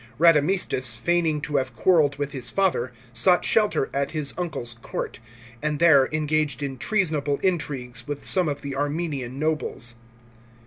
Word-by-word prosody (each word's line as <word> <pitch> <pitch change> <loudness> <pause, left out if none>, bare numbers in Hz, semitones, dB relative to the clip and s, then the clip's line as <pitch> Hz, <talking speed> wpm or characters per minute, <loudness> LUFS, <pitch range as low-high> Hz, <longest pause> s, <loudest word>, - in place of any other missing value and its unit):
Radamistus, 150 -6 +3
feigning 160 +3 +1
to 145 0 -1
have 130 -2 -2
quarrelled 155 -5 +3
with 145 0 -3
his 125 -3 -5
father, 180 -10 0 0.2
sought 180 +10 +4
shelter 210 -10 +2
at 140 0 0
his 150 -3 -1
uncle's 160 -9 -3
court, - - -5 0.4
and 150 -1 -1
there 145 -5 +5
engaged 155 -1 0
in 135 -2 -4
treasonable 155 - 0
intrigues 145 -9 -2
with 145 -1 -5
some 180 -3 +1
of 145 - -4
the 140 -1 -4
Armenian 145 -3 -3
nobles. 150 -5 -2
145 Hz, 145 wpm, -24 LUFS, 135-165 Hz, 0.4 s, there